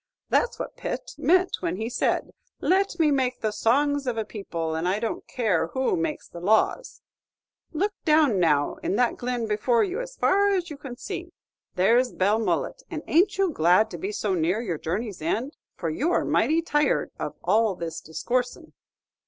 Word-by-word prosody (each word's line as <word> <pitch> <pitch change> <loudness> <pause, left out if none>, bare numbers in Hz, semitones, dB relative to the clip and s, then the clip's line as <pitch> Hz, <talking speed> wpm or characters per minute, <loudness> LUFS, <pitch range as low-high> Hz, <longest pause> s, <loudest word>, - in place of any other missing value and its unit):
That's 480 - +1
what - - -6
Pitt - - -4
meant 370 +2 +3
when 165 - -2
he 220 +4 -3
said, 245 - 0 0.3
'Let 390 +2 +1
me 310 -2 +4
make 260 -2 0
the 215 - 0
songs 280 +6 +1
of 240 -2 -1
a 220 - -1
people, 170 -7 -4
and 160 +2 -1
I 195 +3 +1
don't 225 0 -4
care 195 -10 0
who 260 +7 +1
makes 330 -3 -3
the 170 - -10
laws.' 220 - +1 0.7
Look 400 +6 -1
down 305 - +4
now 150 -4 +2
in - - -2
that 245 +1 +2
glen 245 -1 -2
before 220 +3 +2
you, 395 +5 -2
as - - -8
far 400 +1 +3
as 350 -3 -2
you 295 - -7
can 270 -4 -8
see. 355 +2 -6 0.5
There's 235 +7 +3
Belmullet, 220 - 0
and 315 -3 -5
ain't 355 +6 +3
you 390 -3 +2
glad 180 - +3
to 175 - -6
be 195 +5 -3
so 210 -1 -1
near 180 +4 +1
your 180 -10 -3
journey's 200 +4 -3
end? 230 - -2 0.2
for 165 -3 -3
you're 310 - +1
mighty 325 +2 +2
tired 295 -2 +1
of - - -4
all 220 -3 +2
this 165 -1 -5
discoorsin'." 250 - -3
240 Hz, 180 wpm, -25 LUFS, 190-310 Hz, 0.7 s, me